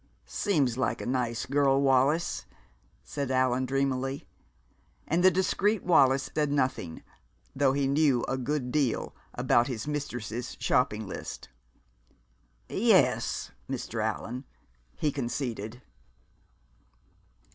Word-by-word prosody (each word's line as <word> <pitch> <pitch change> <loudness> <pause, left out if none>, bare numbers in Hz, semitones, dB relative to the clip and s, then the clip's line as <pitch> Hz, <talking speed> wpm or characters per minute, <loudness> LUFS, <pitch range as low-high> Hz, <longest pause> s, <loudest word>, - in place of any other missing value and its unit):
"Seems 140 - 0
like 125 -4 0
a - - -5
nice 120 -2 -1
girl, 140 0 +3
Wallis," 140 - +2 0.6
said 140 -3 -4
Allan 130 0 +2
dreamily. 135 0 -1 0.8
And 170 +3 +1
the 185 - +9
discreet 190 +3 +1
Wallis 135 -6 +4
said 150 -2 +1
nothing 130 - -1 0.5
(though 135 -1 +3
he 140 0 +1
knew 140 -3 +3
a - - 0
good 130 0 -2
deal) 140 -5 0 0.2
about 120 +1 +3
his 120 -3 -4
mistress's 120 -5 -4
shopping 110 -4 +1
list. 95 - -7 1.2
"Yes, - - +2 0.2
Mr. - - -3
Allan," 125 +3 -3 0.5
he 150 - 0
conceded. 120 -3 -4
135 Hz, 105 wpm, -28 LUFS, 125-145 Hz, 1.2 s, the